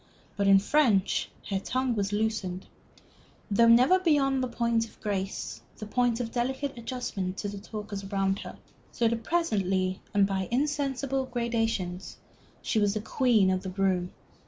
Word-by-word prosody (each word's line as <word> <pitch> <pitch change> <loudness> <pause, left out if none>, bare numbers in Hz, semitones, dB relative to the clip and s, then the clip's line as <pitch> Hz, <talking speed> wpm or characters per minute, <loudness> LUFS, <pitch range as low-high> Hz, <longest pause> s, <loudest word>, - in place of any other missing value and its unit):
But 200 -1 +1
in 195 0 +8
French 205 -2 +2 0.2
her 195 - +1
tongue 255 +4 -1
was 200 -2 -1
loosened, 205 -4 -2 0.9
though 230 +3 +5
never 250 +11 +6
beyond 280 -6 +2
the 255 - 0
point 235 -1 0
of - - -23
grace, 195 -2 -3 0.2
the 215 - -6
point 240 +2 +1
of 230 -2 -3
delicate 265 +3 -2
adjustment 230 -6 -4
to 205 - -3
the 200 0 -6
talkers 205 -1 -6
round 195 0 0
her. - - -8 0.3
So 235 - +1
that 230 0 -1
presently, 195 - 0
and 200 -1 +4
by 190 -2 -2
insensible 270 0 -1
gradations, 225 -7 -2 0.5
she 220 - +1
was 205 0 +2
the 215 - -1
queen 225 -5 +3
of 185 0 0
the 190 - -5
room. 185 -1 0
220 Hz, 160 wpm, -28 LUFS, 195-250 Hz, 0.9 s, in